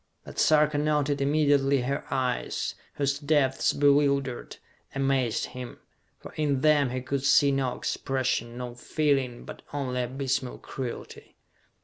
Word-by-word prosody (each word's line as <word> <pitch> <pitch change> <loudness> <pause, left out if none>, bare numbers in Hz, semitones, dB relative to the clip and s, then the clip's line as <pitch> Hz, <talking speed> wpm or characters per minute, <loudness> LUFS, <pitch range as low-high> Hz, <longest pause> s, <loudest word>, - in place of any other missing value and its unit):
But - - -8
Sarka 150 -1 +4
noted 145 -1 +1
immediately 140 -2 +3
her 140 +3 -2
eyes, 125 -2 -1 0.2
whose 140 0 0
depths 145 -3 +2
bewildered, 140 -3 +1 0.4
amazed 135 -4 +1
him. 125 -1 -7 0.4
For - - -12
in 145 -3 0
them 150 -3 +4
he 130 +1 -3
could 135 +1 -2
see 140 0 +5
no 135 -2 -1
expression, 130 -3 -2
no 125 -1 -5
feeling, 135 -1 -1
but - - -9
only 130 -3 -2
abysmal 130 +1 -2
cruelty. 125 -3 -7
135 Hz, 125 wpm, -27 LUFS, 130-145 Hz, 0.4 s, see